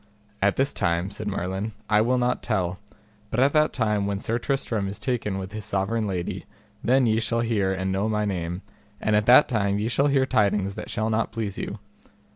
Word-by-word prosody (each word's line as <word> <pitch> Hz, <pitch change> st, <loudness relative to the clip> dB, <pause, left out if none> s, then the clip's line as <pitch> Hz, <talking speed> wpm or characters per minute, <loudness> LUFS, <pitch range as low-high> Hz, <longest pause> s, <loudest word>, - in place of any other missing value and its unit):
At 100 Hz, 0 st, +3 dB
this 135 Hz, +1 st, +1 dB
time, 85 Hz, 0 st, 0 dB
said 105 Hz, +1 st, -6 dB
Merlin, 95 Hz, +2 st, -3 dB
I 105 Hz, 0 st, +4 dB
will 125 Hz, +3 st, +2 dB
not 125 Hz, 0 st, 0 dB
tell, 90 Hz, 0 st, -1 dB, 0.5 s
but 115 Hz, -, -2 dB
at 135 Hz, +2 st, +4 dB
that 155 Hz, 0 st, +4 dB
time 105 Hz, -4 st, 0 dB
when 100 Hz, -1 st, -1 dB
Sir 115 Hz, +4 st, -1 dB
Tristram 115 Hz, -6 st, -1 dB
is 100 Hz, -, -4 dB
taken 115 Hz, -7 st, -2 dB
with 95 Hz, 0 st, -5 dB
his 110 Hz, 0 st, -6 dB
sovereign 100 Hz, +3 st, -1 dB
lady, 90 Hz, -3 st, -4 dB, 0.4 s
then 130 Hz, +2 st, +4 dB
ye 110 Hz, -1 st, +2 dB
shall 115 Hz, +1 st, 0 dB
hear 105 Hz, -5 st, +1 dB
and 95 Hz, 0 st, -1 dB
know 100 Hz, +3 st, 0 dB
my 105 Hz, -1 st, 0 dB
name, 90 Hz, -2 st, -3 dB, 0.4 s
and 110 Hz, -, +1 dB
at 105 Hz, 0 st, +2 dB
that 130 Hz, +4 st, +8 dB
time 100 Hz, -5 st, 0 dB
ye 105 Hz, +2 st, -1 dB
shall 135 Hz, +4 st, +2 dB
hear 135 Hz, -2 st, +3 dB
tidings 100 Hz, -4 st, +1 dB
that -, -, -7 dB
shall 110 Hz, +1 st, -1 dB
not 110 Hz, +1 st, 0 dB
please 110 Hz, -3 st, -4 dB
you. -, -, -4 dB
105 Hz, 210 wpm, -25 LUFS, 95-115 Hz, 0.5 s, that